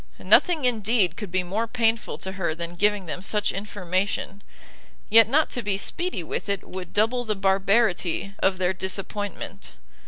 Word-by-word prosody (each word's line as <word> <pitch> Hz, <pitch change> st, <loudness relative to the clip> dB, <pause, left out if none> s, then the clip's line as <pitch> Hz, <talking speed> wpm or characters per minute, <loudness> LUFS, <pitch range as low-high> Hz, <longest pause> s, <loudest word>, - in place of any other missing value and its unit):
Nothing 330 Hz, -7 st, +4 dB
indeed 220 Hz, -6 st, +2 dB
could 210 Hz, -1 st, -6 dB
be 185 Hz, +1 st, 0 dB
more 210 Hz, +6 st, -2 dB
painful 225 Hz, -1 st, 0 dB
to 190 Hz, -, -4 dB
her 180 Hz, -4 st, -2 dB
than 170 Hz, 0 st, -5 dB
giving 205 Hz, +2 st, +1 dB
them 175 Hz, +2 st, -5 dB
such 210 Hz, +2 st, 0 dB
information, 195 Hz, 0 st, -3 dB, 0.7 s
yet 225 Hz, 0 st, +7 dB
not 305 Hz, +5 st, +2 dB
to 245 Hz, -, -2 dB
be 205 Hz, -3 st, -1 dB
speedy 345 Hz, -, -2 dB
with 165 Hz, -, -5 dB
it 200 Hz, -1 st, -1 dB
would 185 Hz, -2 st, -7 dB
double 230 Hz, +4 st, +1 dB
the 215 Hz, -3 st, -1 dB
barbarity 195 Hz, -1 st, +1 dB
of 190 Hz, -1 st, +2 dB
their 185 Hz, 0 st, +1 dB
disappointment. 195 Hz, +2 st, -4 dB
200 Hz, 160 wpm, -25 LUFS, 185-225 Hz, 0.7 s, yet